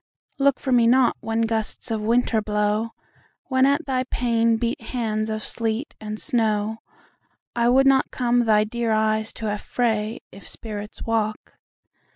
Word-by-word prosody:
Look 275 -1 +3
for 265 - -3
me 240 -2 +5
not 250 0 +4
when 225 0 -1
gusts 225 +1 -2
of 220 -1 -1
winter 230 0 +2
blow, 210 +2 0 0.6
When 260 0 +4
at 285 +4 +1
thy 255 -2 0
pane 230 -2 +1
beat 235 +1 -2
hands 220 -2 -2
of 215 -1 -3
sleet 225 +4 -2
and 215 0 -5
snow;I 225 0 -2
would 265 +2 +5
not 270 -1 +4
come 245 -1 +1
thy 210 -1 +4
dear 230 +1 -2
eyes 220 0 +1
to 225 - -7
affray, 215 +1 -1
If 195 - -12
spirits 210 -2 -7
walk. 215 -2 -2
225 Hz, 150 wpm, -23 LUFS, 215-245 Hz, 0.6 s, me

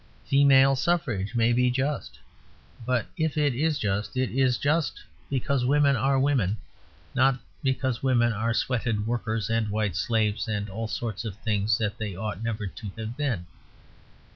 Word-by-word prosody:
Female 135 -1 +5
suffrage 130 - -1
may 120 0 +3
be 125 +1 +3
just. 135 +4 -2 0.7
But 125 -4 +1
if 160 -1 -1
it 145 -3 +2
is 150 +4 +1
just, 105 +1 -2
it 130 -1 0
is 130 -1 +2
just 150 +1 0 0.3
because 135 0 0
women 140 +1 +4
are 135 +3 +2
women, 130 -8 +1 0.6
not 130 0 +3 0.2
because 130 -3 0
women 120 -3 +3
are 115 +3 -1
sweated 115 -4 0
workers 110 -3 -1
and 115 -2 +1
white 105 -4 -1
slaves 110 +3 0
and 105 -2 -2
all 110 +3 -3
sorts 105 +2 -4
of 110 -5 -5
things 110 0 0
that 105 -3 -2
they 105 -4 -4
ought 105 +2 -4
never 115 -2 -2
to 100 +1 -7
have 110 +1 -5
been. 125 - -2
120 Hz, 160 wpm, -26 LUFS, 110-135 Hz, 0.7 s, Female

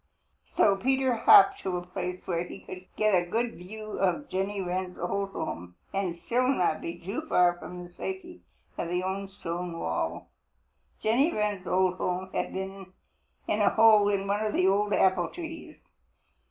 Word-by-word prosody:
So 200 -2 +5
Peter 265 +4 +2
hopped 395 - +7
to 185 -2 -2
a 175 - -6
place 180 0 -5
where 170 -2 -1
he 180 - -10
could 185 0 -10
get 215 -1 +2
a 175 -1 +2
good 230 +4 0
view 215 +5 -8
of 195 +10 0
Jenny 195 +1 -2
Wren's 185 0 -3
old 195 +3 -2
home 90 - -5 0.2
and 185 -3 -1
still 250 +8 0
not 180 - +1
be 170 - -5
too 195 - -4
far 180 -1 +4
from 180 0 -8
the - - -9
safety 355 - -6 0.4
of - - -1
the 180 +1 -1
old 195 +1 -3
stone 175 -2 -5
wall. 80 - -3 0.8
Jenny 260 +9 +3
Wren's 205 - -2
old 185 0 +2
home 185 +1 -2
had - - -1
been 190 0 -6 0.5
in 210 - +1
a 205 - +5
hole 215 -2 +6
in 200 -1 0
one 205 +2 0
of 215 - -1
the 185 - +2
old 205 +2 +2
apple 185 -3 +3
trees. 330 -2 -8
190 Hz, 175 wpm, -28 LUFS, 180-215 Hz, 0.8 s, hopped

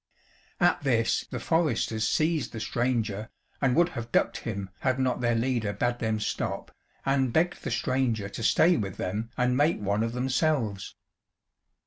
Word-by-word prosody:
At 175 -1 +3
this 120 -5 +1
the - - -4
foresters 120 -9 +1
seized 155 -6 0
the 115 - -5
stranger, 115 -3 -1 0.3
and 130 -3 +3
would 170 0 +4
have 120 -7 -6
ducked - - +2
him 100 -4 -5
had 130 -1 +1
not 130 -2 0
their 120 -1 +2
leader 115 -3 0
bade 120 +2 -1
them 110 -1 0
stop, 105 - -3 0.3
and 135 -2 +2
begged 175 +7 +1
the - - -2
stranger 120 -3 0
to 100 - -7
stay 165 +9 +4
with 95 -3 -3
them 105 +5 -3
and 125 0 +2
make 150 +5 +2
one 100 +1 0
of 115 +1 -1
themselves. 125 -5 0
120 Hz, 160 wpm, -27 LUFS, 110-135 Hz, 0.3 s, would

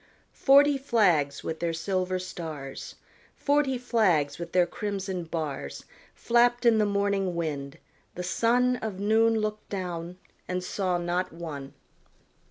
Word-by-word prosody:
Forty 280 0 +5
flags 180 - +2
with 160 - -4
their 170 -1 -1
silver 185 +2 -1
stars, 160 -7 -7 0.4
Forty 285 -2 +1
flags 190 - +1
with 170 0 -6
their 180 -1 +4
crimson 190 -1 -4
bars, 150 - -5 0.3
Flapped 240 +1 +2
in 230 -2 +5
the 210 - +3
morning 200 -2 0
wind; 150 -3 -3 0.4
the 180 - -4
sun 245 +6 +2
Of 215 -5 -5
noon 225 +2 +3
looked 215 -1 -3
down, 180 -2 -4 0.3
and 180 0 -2
saw 185 -1 -1
not 175 +1 -1
one. 150 -5 -7
185 Hz, 130 wpm, -27 LUFS, 170-220 Hz, 0.4 s, Forty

